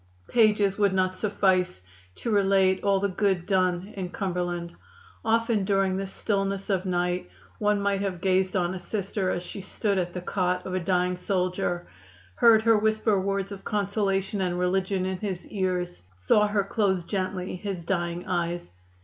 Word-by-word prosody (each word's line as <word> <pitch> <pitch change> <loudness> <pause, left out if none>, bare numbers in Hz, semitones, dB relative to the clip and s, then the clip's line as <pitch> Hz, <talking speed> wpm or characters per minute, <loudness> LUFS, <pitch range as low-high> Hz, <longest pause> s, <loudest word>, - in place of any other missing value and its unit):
Pages 210 -4 +3
would 200 -2 +3
not 185 0 +1
suffice 185 - +1 0.3
to 230 - -3
relate 195 -2 +3
all 200 -1 +3
the 200 - +1
good 190 -2 0
done 185 0 0
in 185 -3 -4
Cumberland. 175 -2 -3 0.5
Often 225 -2 +2
during 195 -1 +2
the 195 0 -2
stillness 195 0 -2
of 190 0 0
night 180 - -1 0.3
one 210 -1 +2
might 200 -1 0
have 190 -3 -2
gazed 185 +1 +1
on 180 -1 +1
a 190 - -5
Sister 195 0 -2
as 175 - -2
she 195 - -7
stood 200 +1 -1
at 175 -1 -2
the 180 - -3
cot 180 0 -1
of 185 - -4
a 185 - +1
dying 180 0 +1
soldier, 180 -1 -1 0.5
heard 225 -2 +6
her 225 -1 +5
whisper 215 -2 +2
words 195 0 -1
of 195 -1 -8
consolation 200 -1 0
and 180 -1 0
religion 185 +1 0
in 190 -1 -2
his 190 -4 -4
ears, 180 -3 -2
saw 95 - +3
her 205 -1 +1
close 195 -3 0
gently 185 -1 -3
his 185 -3 -5
dying 175 -1 -2
eyes. 175 - -2
190 Hz, 165 wpm, -26 LUFS, 180-200 Hz, 0.5 s, heard